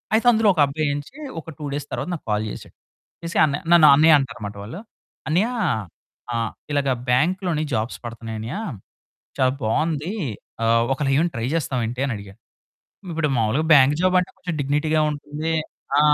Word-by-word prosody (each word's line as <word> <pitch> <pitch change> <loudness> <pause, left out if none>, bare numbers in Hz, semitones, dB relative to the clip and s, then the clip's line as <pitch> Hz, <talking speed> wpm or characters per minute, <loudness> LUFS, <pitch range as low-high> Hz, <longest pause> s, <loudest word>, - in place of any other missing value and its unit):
అయితే 230 +2 +2
అందులో 220 -2 +3
ఒక 160 - +2
అబ్బాయి 150 +2 -1
నుంచి 145 - -7 0.2
ఒక 160 - -12
2 150 - -5
డేస్ 145 0 -4
తర్వాత - - -3
నాకు 160 - -11
కాల్ 105 +1 0
చేసాడు. - - -10 0.5
చేసి 170 0 -3
అన్నయ్య 140 -2 -2
నన్ను 165 -3 +8
అన్నయ్య 155 +2 +7
అంటారు 130 -4 -4
అన్నమాట 100 0 -6
వాళ్ళు. 120 - -8 0.5
అన్నయ్య 185 +9 +2 0.8
ఆహ్, 115 -1 -1 0.2
ఇలాగ 140 -1 +1 0.2
బ్యాంక్‌లోని 170 +4 +1
జాబ్స్ 110 +3 -2
పడతన్నాయి 115 -1 -6
అన్నయ్య 115 +5 -5 0.8
చాలా 130 -1 +4
బావుంది. 155 - 0 0.5
ఆహ్, 115 +1 +4
ఒకేళ 135 +1 0
ఏమైనా 170 +3 +2
ట్రై 115 +1 -2
చేస్తావా 135 -6 -1
ఏంటి 125 +3 -4
అని 135 - -2
అడిగాడు. 100 -1 -12 0.7
ఇప్పుడు 160 -2 0
మాములుగా 115 +6 +1
బ్యాంక్ 140 0 +6
జాబ్ 185 0 +2
అంటే 180 - -5
కొంచెం 175 -2 -4
డిగ్నిటీ‌గా 150 +3 +1
ఉంటుంది. 150 +2 -4 0.5
ఆ! - - +6
145 Hz, 165 wpm, -22 LUFS, 120-165 Hz, 0.8 s, నన్ను